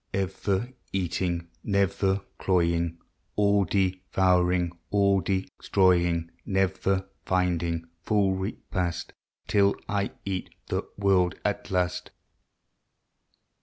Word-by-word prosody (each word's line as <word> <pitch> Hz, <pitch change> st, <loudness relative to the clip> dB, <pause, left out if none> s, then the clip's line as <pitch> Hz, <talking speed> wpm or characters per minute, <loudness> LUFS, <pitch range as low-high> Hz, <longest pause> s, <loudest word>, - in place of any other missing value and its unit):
Ever 100 Hz, +4 st, -1 dB, 0.2 s
eating, 90 Hz, -2 st, -1 dB, 0.2 s
never 100 Hz, -1 st, +1 dB, 0.2 s
cloying, 85 Hz, -2 st, +1 dB, 0.4 s
All 100 Hz, -1 st, +3 dB
devouring, 90 Hz, -1 st, +2 dB, 0.2 s
all 100 Hz, -1 st, +3 dB
destroying, 90 Hz, -2 st, +1 dB
Never 95 Hz, 0 st, 0 dB, 0.2 s
finding 85 Hz, -2 st, 0 dB, 0.2 s
full 100 Hz, -1 st, +2 dB
repast 95 Hz, -2 st, -3 dB, 0.3 s
Till 100 Hz, -1 st, +4 dB
I 100 Hz, -1 st, 0 dB, 0.2 s
eat 95 Hz, -2 st, -3 dB, 0.2 s
the -, -, -1 dB
world 95 Hz, -2 st, +3 dB
at 105 Hz, -1 st, -1 dB
last. 90 Hz, -1 st, 0 dB
95 Hz, 85 wpm, -27 LUFS, 90-100 Hz, 0.4 s, Till